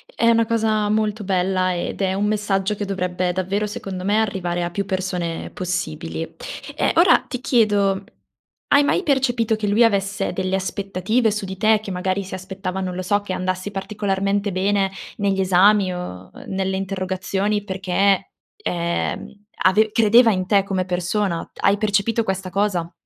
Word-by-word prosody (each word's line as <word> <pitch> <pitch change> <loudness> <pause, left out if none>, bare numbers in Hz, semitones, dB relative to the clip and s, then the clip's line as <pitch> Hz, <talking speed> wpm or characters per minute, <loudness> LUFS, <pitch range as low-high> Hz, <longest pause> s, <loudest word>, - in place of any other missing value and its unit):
È 230 - +2
una 230 0 +4
cosa 220 -2 +1
molto 215 0 0
bella 185 -1 +1
ed 175 - -4
è 190 -1 +1
un 200 +2 0
messaggio 210 -1 0
che 205 - -4
dovrebbe 180 -2 -1
davvero, 190 +3 -1
secondo 195 -3 -6
me, 205 +3 +2
arrivare 180 -5 -1
a 175 - -3
più 200 +2 -2
persone 180 -3 -3
possibili. 165 -3 -3 0.5
Eh, - - +1
ora - - +6
ti 250 - -4
chiedo, 205 -6 +2 0.7
hai 285 - +6
mai 290 - +1
percepito 245 - +1
che 215 -1 -3
lui 210 +4 +4
avesse 200 -3 +1
delle 190 0 -1
aspettative 195 +4 0
su 210 -1 -3
di 190 0 -6
te, 215 +2 +4
che 205 - -6
magari 185 +2 -1
si 190 - -9
aspettava, 190 0 -5
non 185 -1 -3
lo 185 - -3
so, 205 +3 +1
che 200 -2 -5
andassi 185 +1 -2
particolarmente 200 0 -1
bene 195 +1 +1 0.3
negli 200 -2 0
esami 190 +1 +4
o 90 - -7
o - - -11
nelle 190 0 -1
interrogazioni 195 +2 -2
perché, 195 0 +1 0.3
ehm, 170 - -2 0.4
ave 215 +3 +4
credeva 230 +1 +5
in 185 -2 -1
te 200 0 +4
come 190 -2 -1
persona? 180 0 -1
Hai 200 +1 +4
percepito 215 +2 +1
questa 190 -2 -3
cosa? 185 -3 -1
195 Hz, 165 wpm, -21 LUFS, 185-210 Hz, 0.7 s, ora